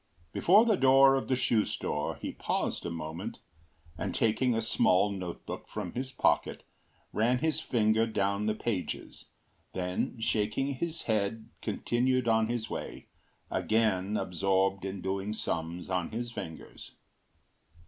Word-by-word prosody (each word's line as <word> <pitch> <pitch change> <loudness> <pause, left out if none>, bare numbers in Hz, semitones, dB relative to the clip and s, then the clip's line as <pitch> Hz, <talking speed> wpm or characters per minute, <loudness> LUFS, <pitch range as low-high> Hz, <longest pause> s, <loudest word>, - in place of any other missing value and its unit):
Before 205 +6 +6
the 220 -4 +3
door 135 +1 +7
of 135 - 0
the 130 - +2
shoe 115 -4 +2
store - - -2
he - - -5
paused - - -2
a - - -2
moment, 80 -1 -5 0.6
and - - -2
taking 115 +2 +2
a - - +1
small 105 -3 +3
note 90 -3 -6
book - - -6
from - - -5
his 130 +1 -3
pocket - - +1 0.5
ran 120 +4 +3
his 155 +3 0
finger 110 -5 +2
down 100 -1 0
the 110 - +1
pages, 110 -5 -4 0.4
then 90 +5 -2
shaking 110 +5 0
his 165 +5 -3
head 110 +1 -1
continued 120 +3 0
on 110 -1 +3
his 115 -1 -2
way, - - -6 0.4
again 105 -2 +1
absorbed 95 +1 +1
in 95 -1 -4
doing 95 +2 -2
sums 85 -3 -3
on 90 -2 -1
his 120 +1 -4
fingers. 80 -8 -8
110 Hz, 140 wpm, -30 LUFS, 95-125 Hz, 0.6 s, door